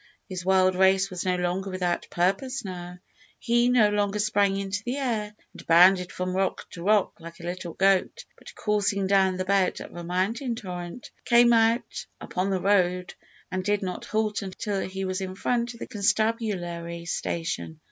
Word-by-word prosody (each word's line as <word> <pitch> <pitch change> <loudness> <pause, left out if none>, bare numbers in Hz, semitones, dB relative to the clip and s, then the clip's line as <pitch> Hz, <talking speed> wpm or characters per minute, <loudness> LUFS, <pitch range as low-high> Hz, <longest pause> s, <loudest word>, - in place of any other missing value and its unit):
His 185 -3 -5
wild 185 0 +4
race 190 +1 +3
was 180 0 -4
no 185 -1 +2
longer 180 +2 -2
without 180 -2 -2
purpose 205 +9 -1
now. 180 -1 -7 0.4
He 240 0 +2
no 235 -4 +5
longer 205 0 0
sprang 205 -2 +2
into 195 +1 -3
the 245 +4 -3
air 220 -6 -2 0.2
and - - -13
bounded 180 +2 +6
from 185 0 -3
rock 190 0 -1
to 170 - -9
rock 205 0 +2
like 170 0 -11
a - - -11
wild 175 -1 -5
goat, 195 - +2
but, - - -14
coursing 205 -2 0
down 190 -1 +3
the 185 - -2
bed 195 -1 +2
of - - -10
a 175 - -6
mountain 205 +8 -1
torrent, 180 0 -7
came 240 0 +5
out 230 +1 +1
upon 185 +2 -2
the 190 -1 0
road, 180 -2 +1 0.4
and 185 0 -2
did 205 +1 0
not 185 -1 -4
halt 215 -1 -1
until 195 +1 -3
he 190 +1 -4
was 185 +1 -2
in 185 -1 -5
front 240 +3 -1
of - - -14
the - - -5
constabulary 195 -6 -1
station. 165 -2 -3
190 Hz, 180 wpm, -26 LUFS, 180-210 Hz, 0.4 s, bounded